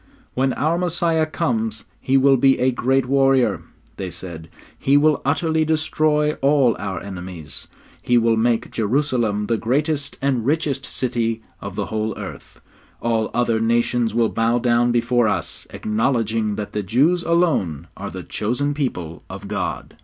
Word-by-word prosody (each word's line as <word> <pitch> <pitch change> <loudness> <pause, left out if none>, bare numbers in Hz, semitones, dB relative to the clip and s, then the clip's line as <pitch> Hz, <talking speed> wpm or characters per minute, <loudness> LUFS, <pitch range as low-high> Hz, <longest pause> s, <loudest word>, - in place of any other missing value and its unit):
'When 130 +1 +1
our 165 +3 0
Messiah 170 -2 +1
comes 110 -7 -2
He 135 +1 +2
will 135 0 +5
be 135 +1 +4
a 130 +1 +2
great 130 +1 +1
warrior,' 135 -1 +3 0.4
they 95 -2 -4
said. 85 -2 -7 0.3
'He 140 +1 +3
will 150 0 +3
utterly 160 +3 +1
destroy 155 -1 +1
all 135 -4 +4
our 95 -3 -3
enemies. 90 -6 -8 0.3
He 120 - +2
will 115 -1 +3
make 115 +1 +1
Jerusalem 115 -3 0
the 115 +1 0
greatest 140 +5 -1
and 135 -4 0
richest 140 0 0
city 115 -3 -2 0.2
in - - -6
the - - -2
whole 110 -1 -2
earth; - - -9 0.4
all 115 -2 0
other 120 -2 +2
nations 115 0 +1
will 115 -2 +3
bow 115 +1 +1
down 120 0 +2
before 120 0 +2
us, - - -2
acknowledging 110 -1 0
that 105 0 -5
the 105 - -1
Jews 140 - +2
alone 165 - +1
are - - -6
the - - -7
chosen 125 +7 -1
people 90 - -3
of - - -8
God.' - - -4
120 Hz, 155 wpm, -21 LUFS, 110-140 Hz, 0.4 s, will